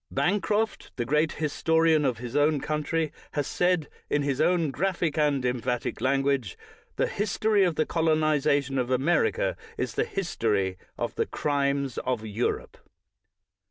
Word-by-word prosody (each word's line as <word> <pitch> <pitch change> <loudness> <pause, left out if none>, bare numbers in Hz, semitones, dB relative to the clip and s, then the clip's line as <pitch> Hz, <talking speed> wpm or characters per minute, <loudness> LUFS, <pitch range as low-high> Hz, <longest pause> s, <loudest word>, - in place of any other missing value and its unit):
Bancroft, 210 +3 0
the 120 - -2
great 150 +5 +2
historian 160 0 +2
of 125 -4 +1
his 120 +2 -7
own 145 0 +3
country, 155 +2 -1 0.2
has 145 -2 0
said, 180 -2 +1 0.2
in 145 - +1
his 140 0 0
own 165 -2 +2
graphic 170 -1 -1
and 145 -4 +1
emphatic 125 -1 -2
language, 135 -5 +1 0.4
"The - - +2
history 210 0 +1
of 175 -4 +1
the 155 - +1
colo 160 -1 +2
uization 145 -3 +1
of 125 -1 -1
America 305 - +1 0.2
is - - -2
the - - +1
history 105 - -1 0.2
of - - -2
the - - -1
crimes 140 -2 -1
of 125 -4 -2
Europe." 110 +3 -2
150 Hz, 145 wpm, -27 LUFS, 130-165 Hz, 0.4 s, own